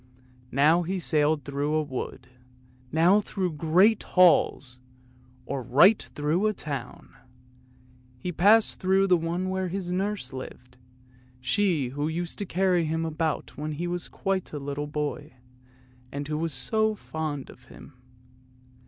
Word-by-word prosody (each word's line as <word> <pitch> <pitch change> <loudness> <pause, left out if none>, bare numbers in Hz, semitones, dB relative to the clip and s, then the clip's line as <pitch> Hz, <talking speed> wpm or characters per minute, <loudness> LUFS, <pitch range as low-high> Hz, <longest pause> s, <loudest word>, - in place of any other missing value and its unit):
Now 150 +6 +4
he 185 +3 -2
sailed 155 -3 +1
through 145 +2 -1
a 155 - +2
wood, 130 -2 -6 0.7
now 170 +6 +4
through 185 -4 -3
great 180 +8 +3
halls, 140 -8 +3 0.7
or 135 +1 -3
right 175 - +5
through 155 +8 -1
a 215 - +1
town; 140 - -7 1.0
he 180 +8 -4
passed 205 +7 +4
through 190 +1 +3
the 185 -2 +4
one 170 +3 -2
where 190 0 -1
his 180 0 -4
nurse 195 -2 -2
lived, 125 -1 -10 0.6
she 160 -1 +1
who 145 +3 -3
used 170 +4 -4
to 205 - -3
carry 180 -2 +1
him 160 +1 -1
about 160 -1 -2
when 155 +1 -4
he 165 +4 -4
was 175 0 -3
quite 195 -1 -3
a - - -3
little 145 +1 -4
boy 150 0 -4 0.8
and 140 0 -5
who 150 0 -2
was 165 0 -1
so 215 - +1
fond 155 -7 -5
of 125 - -19
him. 135 - -14
160 Hz, 145 wpm, -26 LUFS, 145-185 Hz, 1.0 s, right